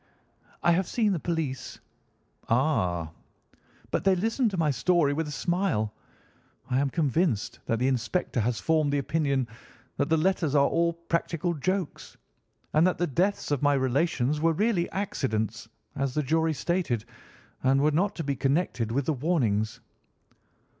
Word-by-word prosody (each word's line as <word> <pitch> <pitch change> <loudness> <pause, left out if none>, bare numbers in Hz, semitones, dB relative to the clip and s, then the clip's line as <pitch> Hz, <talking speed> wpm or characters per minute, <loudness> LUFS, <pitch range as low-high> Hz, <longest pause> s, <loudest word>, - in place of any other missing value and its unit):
"I 175 - +5
have 180 +1 +2
seen 220 -4 +1
the 175 - -1
police." 155 -6 -3 0.7
"Ah!" 90 - +1 0.8
"But - - 0
they 195 0 +4
listened 225 +6 +1
to 195 - -4
my 155 -3 +2
story 145 +3 +2
with 160 +1 -2
a - - -5
smile. 150 - 0 0.8
I 125 - +3
am 140 0 +1
convinced 150 - 0
that 115 - +1
the 125 +3 +1
inspector 130 +3 -1
has 115 +1 0
formed 155 -3 +2
the 145 - +1
opinion 140 -3 0 0.5
that - - 0
the 160 - +4
letters 160 -3 +1
are 140 -1 +5
all 170 +2 +2
practical 170 0 -2
jokes, 185 +2 -3 0.6
and 155 +4 +5
that 185 - 0
the 175 - +1
deaths 180 +4 0
of 145 - +1
my 145 -1 +4
relations 135 +1 +1
were 165 0 +3
really 195 -1 +1
accidents, 115 - -2 0.3
as 135 -2 -2
the 150 - +1
jury 160 +3 +1
stated, 140 - -1 0.6
and 135 +1 +3
were 150 +2 +3
not 180 +7 +1
to 165 - -4
be 140 -1 -1
connected 135 -4 0
with 135 +3 0
the 155 - +1
warnings." 120 - 0
150 Hz, 160 wpm, -27 LUFS, 130-170 Hz, 0.8 s, I